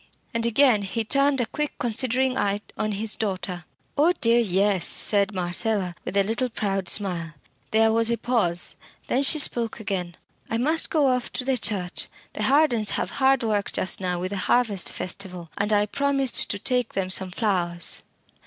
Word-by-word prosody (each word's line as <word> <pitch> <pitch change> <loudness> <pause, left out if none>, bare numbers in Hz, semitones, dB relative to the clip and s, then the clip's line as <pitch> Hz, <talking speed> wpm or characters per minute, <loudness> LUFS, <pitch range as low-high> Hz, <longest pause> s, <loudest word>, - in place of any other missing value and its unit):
And 230 0 -1
again 235 -2 +3
he 210 +3 -3
turned 275 +3 +2
a - - 0
quick 300 +6 -4
considering 255 +2 +1
eye 200 -2 -1
on 215 0 -2
his 215 +2 +1
daughter. 185 -5 -4 0.3
"Oh 315 +5 +3
dear! 230 +1 +3
yes," 195 -3 +1
said 200 -1 +4
Marcella, 185 +1 -1
with 200 - -4
a 200 - +4
little 230 +5 -2
proud 195 -4 -3
smile. 170 -6 -1 0.3
There 220 0 +3
was 230 +1 +3
a 235 - 0
pause; 205 -10 +1 0.3
then 260 - 0
she 280 +3 +7
spoke 235 -6 +2
again. 185 -4 -4 0.3
"I 225 - -1
must 310 +7 +1
go 305 -3 +1
off 250 -2 0
to 255 - -4
the 265 0 +1
church; 195 -6 -2 0.3
the - - -6
Hardens 265 -7 +2
have - - -3
hard 270 -2 +2
work 210 -3 -1
just 185 - +1
now 180 -1 -2
with 185 +2 -4
the 200 - -4
harvest 205 -1 +1
festival, 180 -2 -4
and 205 +1 -1
I 205 -1 +3
promised 275 +2 +1
to 200 - -2
take 250 +2 0
them 185 -1 -2
some 190 0 +1
flowers." 180 -4 -2
215 Hz, 180 wpm, -24 LUFS, 190-250 Hz, 0.3 s, she